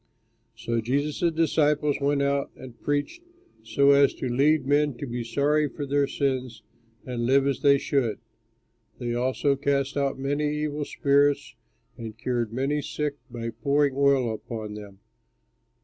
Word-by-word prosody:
So 115 +1 -2
Jesus' 145 +8 0
disciples 150 -2 +2
went 140 0 +1
out 140 0 0
and 125 -3 -12
preached 145 - -2 0.4
so 140 0 +3
as 140 0 +4
to - - -4
lead 140 +5 +2
men 145 0 +2
to 140 - -5
be 120 -1 -4
sorry 145 +5 +1
for 145 - -6
their 140 0 +1
sins 130 -6 -2 0.4
and 120 -2 -3
live 135 +1 +4
as 140 -1 0
they 140 -1 +5
should. 135 -6 0 0.8
They 120 -2 -3
also 130 +3 +1
cast 140 0 -1
out 140 -1 0
many 145 +2 -1
evil 150 -1 -2
spirits 140 0 +1 0.5
and 110 -1 -7
cured 120 -2 -2
many 135 +5 -1
sick 150 0 -3
by 115 -1 -5
pouring 140 +4 +1
oil 135 -4 +3
upon 110 -1 -6
them. 100 -2 -11
140 Hz, 150 wpm, -26 LUFS, 120-145 Hz, 0.8 s, they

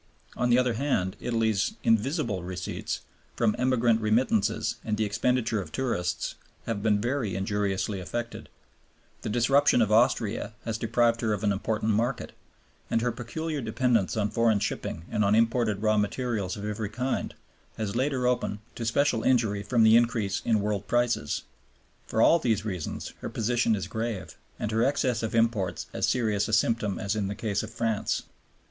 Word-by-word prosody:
On 125 - 0
the 120 - +5
other 125 -1 +2
hand, 110 -7 0
Italy's 115 - 0
"invisible" 115 - +1
receipts, 90 +1 -4 0.3
from 110 -2 +2
emigrant 120 -3 +3
remittances 110 -1 +1
and 105 -2 -1
the 110 - +1
expenditure 110 +1 0
of 80 -4 -9
tourists, 115 -10 -2 0.3
have 115 -3 -2
been 105 -1 +2
very 120 -2 -1
injuriously 100 0 -1
affected; 120 +6 -5 0.7
the - - -4
disruption 125 +5 +4
of 110 -3 +2
Austria 110 -1 +2
has 110 -1 -2
deprived 115 +1 +2
her 110 -2 +1
of 105 - -3
an 105 - +3
important 110 +2 -1
market; 120 +4 -1 0.6
and 115 - +1
her 120 +1 +1
peculiar 145 +6 -4
dependence 115 -2 +1
on 105 -1 0
foreign 115 -2 +3
shipping 85 -4 -3
and 105 - +1
on 100 +1 +3
imported 115 -2 +2
raw 110 0 +3
materials 105 -2 -1
of 100 - -6
every 105 0 -3
kind 125 +5 -2 0.4
has 105 -2 -3
laid 130 +4 +1
her 130 -2 -1
open 125 -4 0 0.2
to 115 - -5
special 125 -1 +2
injury 110 -6 +2
from 115 +2 +2
the 110 0 +7
increase 115 -4 +2
of 115 - +4
world 105 -1 -1
prices. 120 +3 0 0.6
For 110 - +2
all 170 - +6
these 110 -6 0
reasons 90 -7 -4
her - - -5
position 115 0 +1
is 95 - -3
grave, 110 -3 -4 0.2
and 105 - -3
her 110 +1 +2
excess 130 -3 +1
of 115 0 -3
imports 110 -6 +1
as - - 0
serious 105 -5 +1
a 110 - -4
symptom 110 -2 +2
as 100 +2 -2
in 105 -2 -1
the 100 - -4
case 105 -2 -1
of 110 - -6
France. 115 -2 -1
110 Hz, 170 wpm, -27 LUFS, 105-120 Hz, 0.7 s, the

